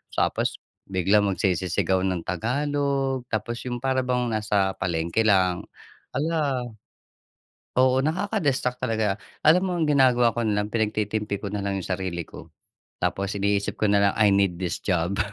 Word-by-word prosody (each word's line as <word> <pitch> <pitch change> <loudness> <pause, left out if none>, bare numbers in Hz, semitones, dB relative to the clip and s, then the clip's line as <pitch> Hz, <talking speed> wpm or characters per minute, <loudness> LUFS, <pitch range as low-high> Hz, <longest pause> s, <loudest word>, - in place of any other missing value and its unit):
tapos - - 0 0.3
biglang 95 +2 +2
magsisisigaw 95 0 0
ng 90 -3 -1
Tagalog, 135 - -1
tapos 110 +2 -3
yung 120 0 -4
para 130 0 +1
bang 125 -1 0
nasa 105 -3 +1
palengke 85 +5 0
lang. 95 -3 +2 0.5
Hala! 145 -4 0 1.2
Oo 130 0 +4
nakaka-distract 155 - 0
talaga. 110 -3 0 0.2
Alam 175 +4 +5
mo 180 - -1
ang 160 - +1
ginagawa 125 -4 +4
ko 120 - +1
na 105 -1 +1
lang, 105 - -5
pinagtitimpi 105 -2 -1
ko 100 - -4
nalang 100 -1 -2
yung - - -8
sarili 90 -2 -2
ko, - - -13 0.5
tapos 100 +1 -1
iniisip 100 0 0
ko 110 - +3
na 100 0 +4
lang, - - -7
"I 105 -2 +5
need 100 -3 +2
this 90 -3 -2
job." 90 0 -1
105 Hz, 150 wpm, -25 LUFS, 95-130 Hz, 1.2 s, Alam